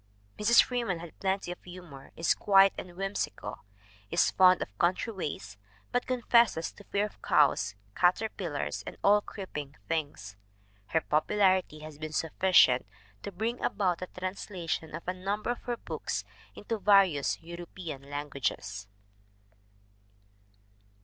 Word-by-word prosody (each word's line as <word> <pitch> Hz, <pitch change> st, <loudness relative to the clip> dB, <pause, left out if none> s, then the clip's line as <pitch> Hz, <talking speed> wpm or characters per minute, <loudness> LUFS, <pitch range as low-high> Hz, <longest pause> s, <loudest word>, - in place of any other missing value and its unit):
Mrs. 220 Hz, +3 st, +6 dB
Free 245 Hz, -1 st, -2 dB
man 190 Hz, -6 st, -1 dB
has 170 Hz, -1 st, -9 dB
plenty 190 Hz, -2 st, -1 dB
of 175 Hz, -, -9 dB
humor, 175 Hz, -7 st, -11 dB
is 165 Hz, -, +2 dB
quiet 195 Hz, -1 st, +5 dB
and 175 Hz, -1 st, -8 dB
whimsical, 195 Hz, +1 st, -3 dB, 0.5 s
is -, -, +3 dB
fond 185 Hz, -1 st, +6 dB
of 100 Hz, -, -13 dB
country 185 Hz, +6 st, +1 dB
ways, 105 Hz, -, -5 dB, 0.3 s
but 245 Hz, -, 0 dB
confesses 235 Hz, -8 st, +3 dB
to 205 Hz, -, -15 dB
fear 200 Hz, +2 st, 0 dB
of 210 Hz, -, -11 dB
cows, 105 Hz, -9 st, +3 dB, 0.2 s
caterpillars 180 Hz, -4 st, 0 dB
and -, -, -7 dB
all 205 Hz, +1 st, +5 dB
creeping 150 Hz, -10 st, -7 dB
things. 145 Hz, -11 st, -3 dB, 0.5 s
Her 160 Hz, -, +1 dB
popularity 185 Hz, 0 st, +2 dB
has 155 Hz, -1 st, -10 dB
been 155 Hz, 0 st, -6 dB
sufficient 160 Hz, -, +4 dB, 0.3 s
to -, -, -6 dB
bring 225 Hz, +6 st, -3 dB
about 185 Hz, -5 st, +1 dB
the 185 Hz, -, -5 dB
translation 180 Hz, -4 st, -4 dB
of 165 Hz, -, -9 dB
a 180 Hz, -, 0 dB
number 200 Hz, +5 st, -2 dB
of 245 Hz, -, -5 dB
her 240 Hz, -1 st, -2 dB
books -, -, -4 dB, 0.3 s
into 220 Hz, +1 st, -4 dB
various 195 Hz, -8 st, +4 dB
European 170 Hz, -4 st, -8 dB
languages. 140 Hz, -9 st, -3 dB
180 Hz, 135 wpm, -30 LUFS, 150-200 Hz, 0.5 s, Mrs